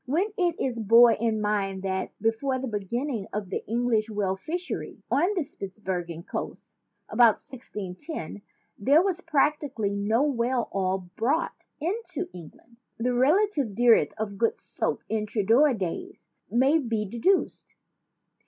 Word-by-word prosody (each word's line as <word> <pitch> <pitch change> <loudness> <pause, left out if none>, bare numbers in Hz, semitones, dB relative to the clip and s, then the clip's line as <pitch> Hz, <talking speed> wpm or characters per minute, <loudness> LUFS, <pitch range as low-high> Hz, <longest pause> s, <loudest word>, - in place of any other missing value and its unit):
When 365 - 0
it 350 -5 0
is 245 -3 -1
borne 230 +2 +7
in 225 -1 +1
mind 195 -2 -1
that, 190 -1 -2
before 230 +4 0
the 260 +1 -4
beginning 225 +2 -3
of 205 -3 -4
the - - -2
Eng 240 +2 0
lish 225 -2 +1
whale 205 -3 -1
fishery 340 - -5
on 360 +8 +2
the 355 - +1
Spitzbergen 185 - -5
coasts - - -6 0.3
about 235 -3 +5
1610 210 - -7 0.4
there 280 - +5
was 370 -2 -1
practically 290 - +1
no 205 +5 +1
whale 250 -3 0
oil 190 -1 -1
brought 285 - -1
into 370 +3 -3
Eng 170 -4 -10
land, 235 0 -25 0.2
the 245 +2 0
relative 285 - +2
dearth 240 0 +4
of 205 -2 -4
good 230 - +1
soap - - -3
in 215 -1 -1
Tudor 230 +7 +3
days 225 - -5 0.2
may 270 +6 +4
be 225 -6 -1
deduced. 240 - 0
235 Hz, 145 wpm, -27 LUFS, 205-290 Hz, 0.4 s, borne